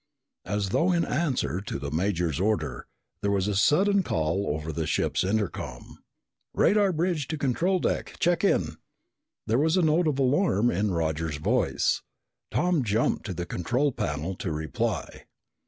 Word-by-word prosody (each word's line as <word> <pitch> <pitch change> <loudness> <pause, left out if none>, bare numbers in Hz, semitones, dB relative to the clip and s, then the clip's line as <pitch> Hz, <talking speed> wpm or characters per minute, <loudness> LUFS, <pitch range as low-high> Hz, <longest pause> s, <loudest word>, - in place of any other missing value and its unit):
As 105 -1 -1
though 170 - +2
in 170 -1 +2
answer 130 - -1
to 105 - -4
the 70 +1 -5
major's 85 -2 0
order, 85 - -1 0.3
there 100 - 0
was 100 -1 +1
a 105 - 0
sudden 195 - +4
call 85 - -1
over 80 +2 -2
the 80 +1 -3
ship's 80 - 0
intercom. 95 - -3 0.6
"Radar 205 -2 +4
bridge 165 -4 -1
to 155 - -3
control 165 +8 +1
deck, - - -2
check 175 +1 +1
in!" 200 - +1 0.7
There 115 +4 +1
was 160 +4 +2
a 180 - +3
note 160 +2 +3
of 145 -3 0
alarm 130 - +2
in 100 +4 0
Roger's 80 -3 -1
voice. 75 - +1 0.5
Tom 175 -5 +1
jumped 110 +1 0
to 95 - -4
the 85 +1 -3
control 125 - 0
panel 75 - -3
to 85 - -3
reply. 80 0 -3
105 Hz, 155 wpm, -27 LUFS, -, 0.7 s, sudden